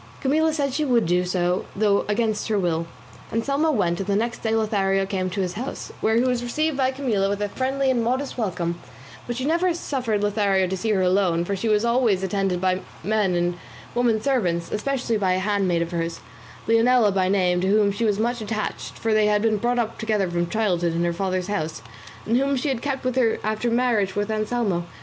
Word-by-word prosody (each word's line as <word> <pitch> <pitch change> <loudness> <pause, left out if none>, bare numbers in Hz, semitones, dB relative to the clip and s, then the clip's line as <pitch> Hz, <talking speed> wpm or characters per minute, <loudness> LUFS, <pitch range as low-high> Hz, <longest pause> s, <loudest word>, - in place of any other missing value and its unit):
Camilla 315 +4 +2
said 285 -4 -1
she 305 - 0
would 245 -5 +2
do 180 +2 +2
so, 180 0 0
though 200 -1 +2
against 215 0 0
her 215 -2 +1
will. 170 -3 0 0.4
Anselmo 275 +7 +1
went, 175 - +1
and 195 - -3
the 200 - +1
next 235 +3 -1
day 220 -1 0
Lothario 195 -3 +1
came 190 -1 -2
to 195 +2 -2
his 180 -1 -2
house, 245 +7 -6
where 220 - +2
he 235 - +3
was 250 -2 +1
received 305 +5 -1
by 265 -1 +2
Camilla 240 -8 0
with 200 0 -2
a 205 0 -1
friendly 265 +3 0
and 240 -3 +1
modest 260 +4 -1
welcome; 175 -6 -2 0.5
but 240 -1 -3
she 260 - -2
never 340 +4 +2
suffered 245 -10 -2
Lothario 200 -2 +2
to 185 +1 -2
see 190 +4 -3
her 195 -3 +2
alone, 180 -2 +2
for 200 - -1
she 195 +4 -3
was 210 +1 +2
always 235 -5 +2
attended 190 -1 0
by 185 0 +1
her - - -8 0.2
men 205 -3 +1
and 175 0 -1 0.3
women 240 -2 +2
servants, 185 -10 0
especially 245 0 -1
by 190 -3 +1
a - - +1
handmaid 190 -3 +1
of 170 - -7
hers, 165 -1 -3 0.5
Leonela 230 -1 +4
by 185 -1 +1
name, 180 -2 +2
to 190 - 0
whom 205 0 +3
she 205 +4 -3
was 210 -3 +2
much 235 +2 -1
attached 215 0 -4
(for 225 -1 0
they 215 -1 +4
had 210 0 +2
been 220 -2 +2
brought 240 +4 0
up 230 -2 -2
together 215 -3 0
from 175 0 -1
childhood 180 -6 0
in 170 +1 0
her 170 0 0
father's 185 0 -1
house), 160 - -3 0.4
and 230 +2 +2
whom 275 +1 +1
she 270 +3 -1
had 260 -4 -2
kept 275 -2 -3
with 255 -1 0
her 235 -4 +2
after 215 +2 -1
her 230 - +1
marriage 230 -6 +1
with 205 +1 -1
Anselmo. 215 -4 -1
210 Hz, 225 wpm, -23 LUFS, 185-240 Hz, 0.5 s, Leonela